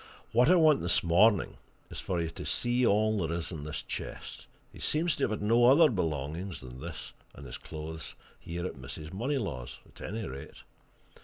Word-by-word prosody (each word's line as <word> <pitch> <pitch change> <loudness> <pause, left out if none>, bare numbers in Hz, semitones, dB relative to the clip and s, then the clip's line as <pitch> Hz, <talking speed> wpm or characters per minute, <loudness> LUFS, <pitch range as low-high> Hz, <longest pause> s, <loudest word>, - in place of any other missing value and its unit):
What 125 +5 +5
I 180 - +7
want 155 -4 +5
this 85 - +2
morning 95 +5 +4 0.3
is - - -6
for 90 -2 -2
you 80 -1 -2
to - - -7
see 120 +1 +1
all 110 +1 +3
there 85 -1 -1
is 85 - -4
in 75 -4 -6
this 75 - -4
chest; - - -6 0.3
he - - -12
seems 160 +2 +2
to 140 - +1
have - - -2
had 110 - -3
no 115 +3 +5
other 145 +4 +7
belongings 80 - -2
than 65 0 -10
this - - -7 0.2
and 70 - -10
his 65 - -7
clothes 80 0 -7 0.2
here 85 +1 -5
at - - -3
Mrs. 75 +5 -8
Moneylaws', 100 - -2
at - - -15
any 110 0 -4
rate. 70 +1 -9
90 Hz, 190 wpm, -30 LUFS, 80-120 Hz, 0.3 s, I